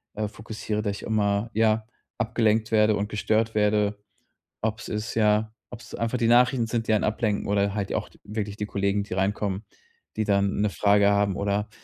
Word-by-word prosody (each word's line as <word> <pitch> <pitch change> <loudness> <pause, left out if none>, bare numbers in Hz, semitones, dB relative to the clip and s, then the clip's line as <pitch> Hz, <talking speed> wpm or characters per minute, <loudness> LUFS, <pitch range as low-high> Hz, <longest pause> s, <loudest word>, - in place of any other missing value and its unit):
äh, 105 0 -1
fokussiere, 105 0 -4
dass 100 -2 -2
ich - - -10
immer 105 0 0
ja, 110 0 +2 0.3
abgelenkt 110 -1 +1
werde 105 -1 +4
und 105 0 -2
gestört 110 +1 0
werde, 105 -1 +2 0.6
ob's 110 -1 -3
ist 105 +2 -4
ja, 110 0 +2 0.2
ob's 120 -1 -11
einfach 115 +2 -1
die 115 - +1
Nachrichten 120 0 +4
sind, 115 0 -2
die - - +3
einen 105 - +2
ablenken 110 -1 -1
oder 100 0 +1
halt 100 -2 -2
auch - - -2 0.2
wirklich 105 -1 -4
die 105 - -2
Kollegen, 100 0 0
die 100 - -7
reinkommen, 95 +1 -1 0.5
die 110 - 0
dann 100 -1 +1
'ne 105 - +2
Frage 100 0 +4
haben 100 -2 +2
oder 100 +1 -1
105 Hz, 180 wpm, -25 LUFS, 100-110 Hz, 0.6 s, werde